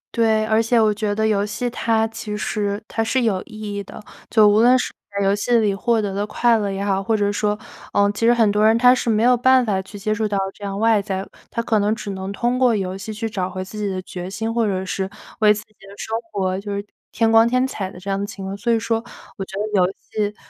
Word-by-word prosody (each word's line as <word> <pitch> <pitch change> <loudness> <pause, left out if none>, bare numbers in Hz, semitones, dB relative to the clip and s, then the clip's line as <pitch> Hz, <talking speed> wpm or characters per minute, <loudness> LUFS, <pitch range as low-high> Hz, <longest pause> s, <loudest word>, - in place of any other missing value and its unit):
对， 220 -2 +3
而 220 +1 +3
且 230 +1 +2
我 215 -1 +4
觉 210 0 -2
得 220 +1 +1
游 205 -2 +2
戏 210 +4 -3
它 225 -2 +1
其 210 -1 -5
实 205 -1 -2
它 225 - -1
是 245 +3 +1
有 200 -5 +1
意 215 -3 -11
义 200 0 -4
的， - - -11 0.3
就 215 -2 +6
无 205 +1 +4
论 250 +2 +6
是 250 - -3 0.2
在 200 0 -1
游 195 - +3
戏 205 +4 -1
里 215 -3 +3
获 225 +3 +1
得 205 -2 -2
的 200 +1 -1
快 235 +2 +3
乐 205 -1 -1
也 195 +1 -3
好， 195 -1 +1
或 220 +2 +1
者 205 -1 +1
说， 210 0 0 0.4
呃， 200 0 +3
其 210 - -5
实 - - +7
很 230 -3 +3
多 210 +1 +2
人 220 +1 +5
他 250 +1 +6
是 250 - -1
没 220 0 +2
有 250 +1 +5
办 255 +1 +4
法 195 -4 0
去 195 +2 -11
接 215 +2 -1
触 215 0 -1
到 205 -1 -1 0.2
这 - - -14
样 200 -1 -3
外 225 -1 +3
在 190 -1 -3
的， - - -16 0.2
他 230 - -2
可 225 -2 +2
能 210 +2 +1
只 205 -3 -6
能 190 0 -5
通 240 +5 -1
过 250 -3 +4
游 190 -2 -2
戏 205 +3 -6
去 215 +1 -3
找 190 -4 -3
回 185 0 -5
自 190 - -11
己 210 - -1
的 190 -1 -2
决 180 0 -7
心， 225 +3 -3
或 230 -2 +1
者 190 -2 -2
是 190 +1 -3 0.3
为 215 -1 +6
自 210 0 -1
己 215 - -33
的 200 -1 -15
生 220 - -4 0.2
活 190 -2 -1
就 200 0 -5
是 200 0 -4 0.3
添 225 0 +2
光 225 0 +6
添 255 +2 +2
彩 200 -7 -4
的 180 - -12
这 195 - -14
样 195 - 0
的 - - -2
情 195 -1 -8
况， 195 +1 -4
所 235 +4 -1
以 230 - +3
说 225 0 -1 0.3
我 195 - -3
觉 190 - -8
得 210 - -1 0.2
游 180 +1 +2 0.2
戏 210 -1 -1
210 Hz, 300 characters per minute, -21 LUFS, 200-225 Hz, 0.4 s, 实